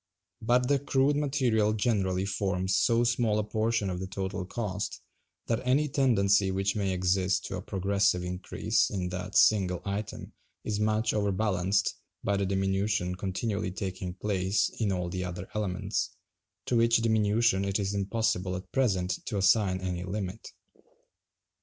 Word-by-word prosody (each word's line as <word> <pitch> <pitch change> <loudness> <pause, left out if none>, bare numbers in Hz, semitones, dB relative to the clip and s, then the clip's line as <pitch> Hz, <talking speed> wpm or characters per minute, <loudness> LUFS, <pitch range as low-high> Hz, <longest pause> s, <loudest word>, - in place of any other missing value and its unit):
But 125 +2 +2
the 140 0 +3
crude 140 +1 +2
material 130 -7 +1
generally 100 -4 0
forms 95 -1 -1
so 115 +6 +3
small 120 -3 +1
a 105 - +1
portion 110 0 0
of 90 -1 -3
the 95 - -4
total 95 -1 -4
cost 105 -3 -4 0.5
that 115 0 0
any 135 +4 +2
tendency 100 -8 +3
which 95 +1 0
may 100 -2 0
exist 95 0 +1
to 95 - -4
a - - -5
progressive 95 -2 +1
increase 90 +1 0
in 90 -2 -3
that 90 +2 -5
single 95 -4 +4
item 100 +1 -5 0.3
is 105 -1 -2
much 110 +1 +1
overbalanced 100 -2 +1 0.3
by 100 - +1
the 100 -1 0
diminution 95 -1 0
continually 100 +2 -2
taking 90 -1 -5
place 95 -1 0
in 105 -4 +1
all 90 -2 -1
the 90 +1 -3
other 90 0 -5
elements; 100 -4 -2 0.6
to 120 - +1
which 115 0 +4
diminution 110 -2 +2
it 100 0 0
is 100 -1 -2
impossible 100 -2 0
at 90 0 -8
present 95 -8 0
to 105 - -2
assign 95 -1 +3
any 90 -1 -3
limit. 95 +2 -5
100 Hz, 150 wpm, -29 LUFS, 95-110 Hz, 0.6 s, single